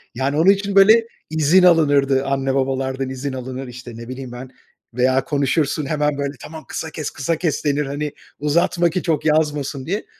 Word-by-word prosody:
yani, 135 +3 -1
onun 165 +5 +5
için 200 0 -2
böyle 220 +4 +6 0.2
izin 160 +4 +3
alınırdı, 145 -6 +4
anne 135 -1 -1
babalardan 135 0 -1
izin 130 +1 -4
alınır, 130 +1 -6
işte, 125 0 -9
ne 115 0 -9
bileyim 130 -1 -7
ben 125 +1 -8 0.4
veya 130 +2 +2
konuşursun, 145 0 0
hemen 150 0 0
böyle, 140 0 -2
“Tamam, 160 0 -10
kısa 160 - -5
kes, 155 -2 -5
kısa 145 +4 -2
kes,” 160 -2 -2
denir, 145 0 +1
hani, 145 +1 -4 0.3
"Uzatma 170 +4 +2
ki 175 +2 -3
çok 160 -4 -1
yazmasın." 150 -3 0
diye. 200 +6 -3
145 Hz, 175 wpm, -20 LUFS, 135-160 Hz, 0.4 s, böyle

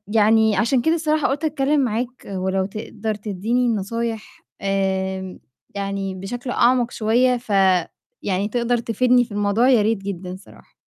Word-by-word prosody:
يعني، 220 0 +4
عشان 240 +4 +2
كده 320 +4 +2
الصراحة 310 -2 +1
قُلت 285 +4 -2
أتكلم 290 0 +1
معاك، 245 +1 -3
ولو 190 0 -1
تقدر 215 +1 -5
تدّيني 215 +4 -1
النصايح، 230 0 -3 0.2
آمم، 190 -1 -2 0.4
يعني 195 -1 -3
بشكل 245 +7 -6
أعمق 245 0 +3
شوية، 245 +3 +2
ف 240 -2 -15 0.7
يعني، 195 +1 0
تقدر 240 +2 0
تفيدني 245 +2 +2
في 230 - -19
الموضوع، 205 +5 +2
يا 245 -5 +5
ريت 220 +2 +1
جدًا 185 -2 -5
الصراحة. 190 +2 -14
220 Hz, 145 wpm, -21 LUFS, 195-245 Hz, 0.7 s, يا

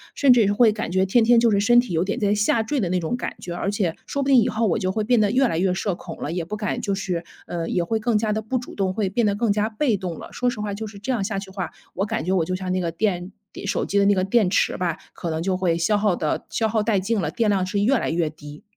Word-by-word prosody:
甚 270 -3 +6
至 225 -5 +4
是 205 - +2
会 220 +1 +5
感 215 -5 -4
觉 190 +1 +2
天 225 +5 +3
天 235 +1 +5
就 230 -1 +3
是 200 - +3
身 240 +4 +5
体 240 -7 -1
有 165 +1 +2
点 200 +2 -2
在 205 -1 +2
下 210 +2 +2
坠 280 +6 -1
的 190 -7 -1
那 180 0 +1
种 165 +7 -2
感 245 - -5
觉， 175 - -6
而 185 - -2
且 195 -5 -1
说 280 -1 -2
不 - - -3
定 270 -2 +6
以 245 - +1
后 225 +1 0
我 195 - +1
就 185 -2 -1
会 215 +2 -1
变 230 0 +3
得 205 - +3
越 255 +4 +3
来 165 -5 -1
越 185 0 +2
社 190 +1 -1
恐 170 -1 -9
了， 150 - -4
也 175 0 -2
不 210 +6 -5
敢 210 - -2
就 200 -1 -1
是 180 -3 -3 0.2
呃， 170 -1 -4
也 175 - 0
会 220 +5 -1
更 225 0 +1
加 210 0 0
地 220 - -1
不 235 +4 -2
主 245 - -7
动， 195 -2 0
会 200 +1 -1
变 215 +3 +1
得 200 - +1
更 225 0 +1
加 210 +1 0
被 225 0 +1
动 180 -4 -5
了。 - - -9
说 250 0 0
实 235 -3 -5
话 210 -1 -3
就 220 - -4
是 205 -1 -11
这 245 +6 -3
样 230 -5 0
下 195 -1 -2
去 195 -1 -9
话， 190 -3 -4 0.2
我 195 - -1
感 220 -6 -2
觉 180 - -1
我 180 -4 +2
就 185 - -2
像 185 0 -4
那 185 - 0
个 175 -2 -1
电 180 0 -1 0.2
底 - - -9
手 - - 0
机 200 - +1
的 200 - +4
那 205 - +5
个 185 - +1
电 195 -1 +2
池 - - +1
吧， 175 -1 -1 0.2
可 170 - -5
能 160 0 -2
就 185 0 0
会 175 -3 +1
消 205 +5 +2
耗 205 -3 +2
得 155 -3 -2
消 225 - 0
耗 220 0 +1
殆 210 -1 +1
尽 215 +3 0
了， 160 -5 -1
电 225 +2 +1
量 190 -2 +1
是 195 +2 -2
越 250 +5 +3
来 - - -2
越 165 -1 0
低。 150 -1 -12
200 Hz, 350 characters per minute, -23 LUFS, 185-220 Hz, 0.2 s, 甚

